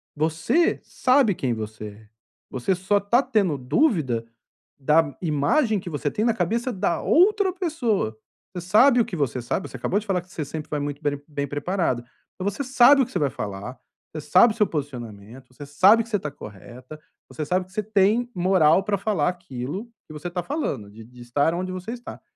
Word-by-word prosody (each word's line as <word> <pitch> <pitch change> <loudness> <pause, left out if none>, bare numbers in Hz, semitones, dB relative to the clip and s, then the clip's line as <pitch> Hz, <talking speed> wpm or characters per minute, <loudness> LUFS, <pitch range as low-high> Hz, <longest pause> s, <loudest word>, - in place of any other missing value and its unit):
você 160 - +1
sabe 255 -5 +2
quem 125 -3 -1
você 110 -1 -6
é, 105 +1 -16 0.4
você 130 +9 -1
só 195 +3 +1
tá 235 +6 +2
tendo 195 - 0
dúvida 135 - +1 0.5
da 150 +1 +2
imagem 180 - +1
que 175 - -8
você 145 -1 -2
tem 215 - -1
na 230 - +3
cabeça 230 +6 -1
da 175 -3 -1
outra 390 +1 +3
pessoa. 245 - -1 0.4
Você 175 -1 -7
sabe 245 +6 +5
o - - +1
que 180 - -6
você 130 -5 -1
sabe, 120 +10 -3
você - - -8
acabou 200 - -1
de 215 - -11
falar 185 -3 0
que 180 - -24
você 155 -5 -4
sempre 155 +1 -7
vai 150 - -2
muito 145 +1 -4
bem 145 -1 -2
bem 140 -2 -4
preparada, 145 -4 -1 0.4
mas 195 +1 -1
você 280 - -3
sabe 265 +2 +6
o - - +2
que 255 - -15
você - - -2
vai 145 -2 +1
falar, 105 +4 -6 0.3
você 155 - -5
sabe 210 +8 +5
o - - -16
seu 210 - +3
posicionamento, 125 -5 -7
você 145 +3 -10
sabe 195 +11 +5
que 230 - -16
você 205 -3 0
tá 150 - -4
correta, 125 +5 -12 0.3
você 155 - -5
sabe 180 +3 0
que 185 - -24
você 215 +2 -2
tem 215 +4 +2
moral 180 -1 +4
pra 205 0 0
falar 185 -6 0
aquilo 175 - -6 0.2
que 155 - -11
você 150 +4 -6
tá 175 0 -4
falando, 275 - -3
de 110 +1 -12
de 125 +2 -15
estar 145 +7 0
onde 185 +1 -3
você 185 +5 -6
está, 245 0 -9
175 Hz, 205 wpm, -24 LUFS, 140-215 Hz, 0.5 s, sabe